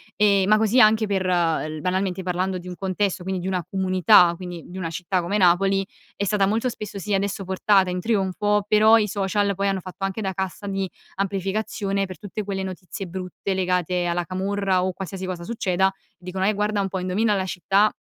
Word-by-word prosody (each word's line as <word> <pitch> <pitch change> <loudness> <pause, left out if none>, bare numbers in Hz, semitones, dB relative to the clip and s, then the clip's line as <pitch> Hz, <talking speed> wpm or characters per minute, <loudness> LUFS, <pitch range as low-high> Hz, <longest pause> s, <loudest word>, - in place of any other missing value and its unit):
Ehm, 200 -2 +3
ma 215 0 +5
così 220 +3 +3
anche 215 0 +5
per 190 -2 0
l 165 -3 0
banalmente 185 0 -1
parlando 185 +1 -1
di 180 +1 -8
un 180 - -6
contesto 190 -1 -1
quindi 190 -1 -3
di 185 - -4
una 185 -2 -1
comunità 185 -1 +5
quindi 180 -3 -7
di 185 - -10
una 165 -3 -3
città 180 +3 -1
come 195 +5 -1
Napoli 195 +1 +3 0.3
è 200 - -2
stata 200 0 +2
molto 225 +4 0
spesso 210 -3 -7
sì 205 +2 -3
adesso 195 0 -1
portata 190 0 +2
in 180 0 -2
trionfo 205 0 +1
però 215 +1 +6
i 210 -1 +1
social 200 +1 0
poi 200 +1 0
hanno 195 -1 0
fatto 185 +2 -9
anche 195 +3 -3
da 190 -1 -2
cassa 190 +1 -4
di 195 -1 -2 0.3
amplificazione 195 +1 -1
per 185 -1 -9
tutte 210 +1 -5
quelle 195 -1 -3
notizie 190 +1 -6
brutte 185 +2 -4
legate 180 -1 0
alla 175 0 0
camorra 190 +1 0
o 185 -1 -1
qualsiasi 190 0 -6
cosa 180 -2 -5
succeda, 190 -3 0 0.2
dicono:" 185 +1 -4
Eh, 215 - +3
guarda 210 0 0
un 195 -1 0
po' 190 - -3
indovina 205 +4 +1
la 190 -1 -1
città" 195 +4 +2
190 Hz, 205 wpm, -23 LUFS, 180-205 Hz, 0.3 s, però